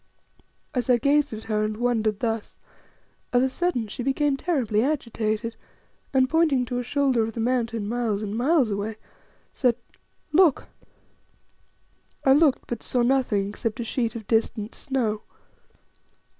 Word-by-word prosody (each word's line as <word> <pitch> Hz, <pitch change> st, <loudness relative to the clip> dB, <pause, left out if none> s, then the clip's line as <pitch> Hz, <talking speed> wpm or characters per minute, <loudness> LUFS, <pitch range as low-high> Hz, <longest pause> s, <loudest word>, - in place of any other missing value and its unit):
As 250 Hz, -1 st, -2 dB
I 245 Hz, -, +6 dB
gazed 285 Hz, +4 st, +2 dB
at 220 Hz, -1 st, -6 dB
her 215 Hz, -1 st, 0 dB
and 215 Hz, 0 st, -2 dB
wondered 220 Hz, -3 st, 0 dB
thus, 225 Hz, -2 st, -2 dB, 0.7 s
of 245 Hz, 0 st, +3 dB
a 265 Hz, -, +2 dB
sudden 260 Hz, -6 st, -1 dB
she 210 Hz, -, -6 dB
became 275 Hz, +2 st, +1 dB
terribly 260 Hz, -9 st, 0 dB
agitated, 230 Hz, -5 st, -1 dB, 0.6 s
and, 260 Hz, -1 st, +3 dB
pointing 300 Hz, -4 st, +2 dB
to 245 Hz, +1 st, -3 dB
a -, -, -2 dB
shoulder 265 Hz, -1 st, +1 dB
of 220 Hz, 0 st, -2 dB
the 230 Hz, -, -6 dB
Mountain 230 Hz, -3 st, 0 dB
miles 220 Hz, -3 st, -1 dB
and 205 Hz, 0 st, -4 dB
miles 260 Hz, -1 st, +2 dB
away, 205 Hz, +2 st, -3 dB, 0.6 s
said 250 Hz, -4 st, +2 dB, 0.6 s
"Look!" 320 Hz, -2 st, +4 dB, 1.6 s
I 265 Hz, -, +7 dB
looked, 290 Hz, -2 st, +3 dB
but 235 Hz, -2 st, -5 dB
saw 245 Hz, -1 st, 0 dB
nothing 240 Hz, -6 st, +1 dB
except 215 Hz, +2 st, -4 dB
a -, -, -1 dB
sheet 230 Hz, 0 st, -2 dB
of 225 Hz, -2 st, -6 dB
distant 225 Hz, 0 st, 0 dB
snow. 230 Hz, -6 st, -2 dB
240 Hz, 145 wpm, -25 LUFS, 220-265 Hz, 1.6 s, I